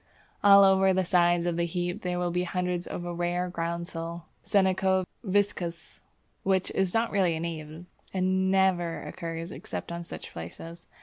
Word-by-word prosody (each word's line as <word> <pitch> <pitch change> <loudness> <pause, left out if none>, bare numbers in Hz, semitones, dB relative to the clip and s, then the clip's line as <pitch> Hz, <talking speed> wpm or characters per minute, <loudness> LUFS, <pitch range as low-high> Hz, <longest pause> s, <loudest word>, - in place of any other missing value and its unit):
All 200 -1 +9
over 190 -1 +5
the 190 0 +1
sides 175 -1 +3
of 175 -1 0
the 170 - +1
heap 175 +1 -3
there 180 -1 -2
will 175 0 0
be 180 +1 0
hundreds 180 0 -2
of 175 - -5
a 175 - -3
rare 175 +1 -1
groundsel 170 0 -4 0.2
(Senecio 190 -1 +2 0.2
viscosus), 190 -4 -1 0.4
which 190 -1 +1
is 190 -2 +1
not 230 +1 +2
really 185 -5 +2
a - - -3
native, 160 0 -6 0.3
and 190 0 +1
never 190 -3 +2
occurs 165 0 -5
except - - -6
on 170 0 -4
such 170 - -9
places. 165 - -9
175 Hz, 165 wpm, -28 LUFS, 170-190 Hz, 0.4 s, All